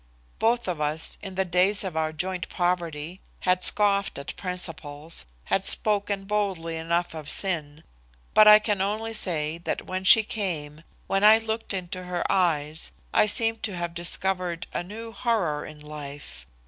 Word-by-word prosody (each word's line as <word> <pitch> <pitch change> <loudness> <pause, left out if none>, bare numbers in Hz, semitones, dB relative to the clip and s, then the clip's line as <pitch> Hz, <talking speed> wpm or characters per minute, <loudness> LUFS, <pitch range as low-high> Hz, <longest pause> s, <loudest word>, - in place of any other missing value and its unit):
Both 235 0 +1
of 170 -4 -3
us, 150 +2 -1
in 190 -2 -8
the 190 0 0
days 185 +4 +3
of 185 -4 -5
our 160 0 0
joint 180 +2 -4
poverty, 175 -1 -2 0.2
had 180 0 +1
scoffed 200 -1 +2
at 140 - -7
principles, 165 - -2 0.2
had 190 - 0
spoken 205 -1 +2
boldly 195 -5 -2
enough 170 +2 -1
of 155 -2 -7
sin, 155 -6 +2 0.5
but 215 - +7
I 210 0 +10
can 210 -2 -1
only 215 +3 -2
say 165 -6 0
that 170 - -4
when 185 0 -4
she 220 +4 +7
came, 165 -8 -4 0.2
when 195 +1 0
I 215 +1 +8
looked 225 0 -4
into 185 -1 -5
her 180 -1 -3
eyes, 160 -4 0 0.2
I 215 - +4
seemed 225 +1 +2
to 205 -4 -3
have 170 -1 -4
discovered 175 0 -1
a - - -2
new 220 +5 -9
horror 195 -12 -1
in 155 0 -12
life. 145 - -9
180 Hz, 160 wpm, -25 LUFS, 160-205 Hz, 0.5 s, I